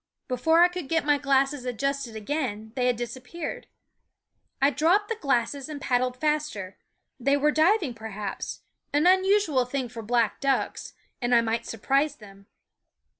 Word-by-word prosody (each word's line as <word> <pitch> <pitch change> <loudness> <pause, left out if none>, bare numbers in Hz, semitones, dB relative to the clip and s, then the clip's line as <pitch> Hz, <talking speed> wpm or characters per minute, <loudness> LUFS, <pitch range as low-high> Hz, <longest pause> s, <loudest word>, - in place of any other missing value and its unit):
Before 320 +7 +3
I - - +7
could 355 -5 -7
get 325 -2 +1
my 290 -1 +3
glasses 275 -1 +1
adjusted 255 -1 -2
again 220 -2 -3
they 250 -1 +1
had 250 - +2
disappeared. 250 +7 -6 0.9
I 275 +1 +4
dropped 355 +8 +2
the 455 - -1
glasses 275 - -1
and 300 -2 -6
paddled 250 -1 0
faster; 300 -12 -1 0.4
they 275 +3 +2
were 300 +1 +3
diving, 320 - +3
perhaps 215 -3 -6 0.3
an 295 +3 +3
unusual 375 -6 +4
thing 250 0 -3
for 230 -1 -7
black 230 0 +1
ducks 275 -1 -1 0.3
and 240 0 +2
I 235 - +6
might 230 0 -2
surprise 275 +6 0
them. 200 -4 -15
270 Hz, 150 wpm, -26 LUFS, 235-300 Hz, 0.9 s, I